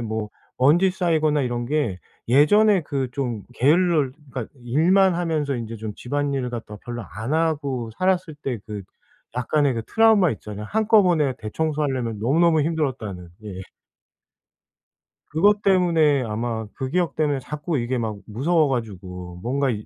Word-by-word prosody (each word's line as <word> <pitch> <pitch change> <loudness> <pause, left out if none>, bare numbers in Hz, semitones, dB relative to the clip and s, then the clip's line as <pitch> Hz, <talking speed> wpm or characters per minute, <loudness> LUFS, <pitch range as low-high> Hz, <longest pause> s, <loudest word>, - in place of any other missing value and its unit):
뭐 110 -2 -3 0.3
먼지 170 +9 +4
쌓이거나 155 -5 +1
이런 120 -1 -2
게 125 -10 -1 0.3
예전에 195 - +5
그 135 -3 -3
좀 120 -7 -3
게을러 155 +1 +3 0.2
그러니까 125 -4 -4 0.2
일만 180 +9 +4
하면서 155 -5 -1
인제 115 -1 -5
좀 110 0 -5
집안일을 140 -1 -2
갖다 115 -3 -7
별로 120 -1 -6
안 110 +8 -4
하고 145 -7 -1
살았을 185 -4 0
때 130 -6 -4
그 105 -2 -6 0.5
약간의 140 +1 +1
그 115 - -3
트라우마 220 - +4
있잖아요. 105 -1 -7
한꺼번에 185 - +3
대청소하려면 130 -2 -2
너무너무 160 +6 +3
힘들었다는. 130 - -3 0.2
예. 95 -3 -7 1.7
그것 205 +7 +3
때문에 165 -8 +3
아마 110 0 -3
그 130 - -4
기억 175 +2 0
때문에 145 -3 +1
자꾸 150 +4 -3
이게 120 +1 -1
막 110 -3 -3
무서워 150 +9 +1
가지고 90 -8 -5
뭔가 135 +4 0
이 105 -3 -3
140 Hz, 315 characters per minute, -23 LUFS, 115-160 Hz, 1.7 s, 예전에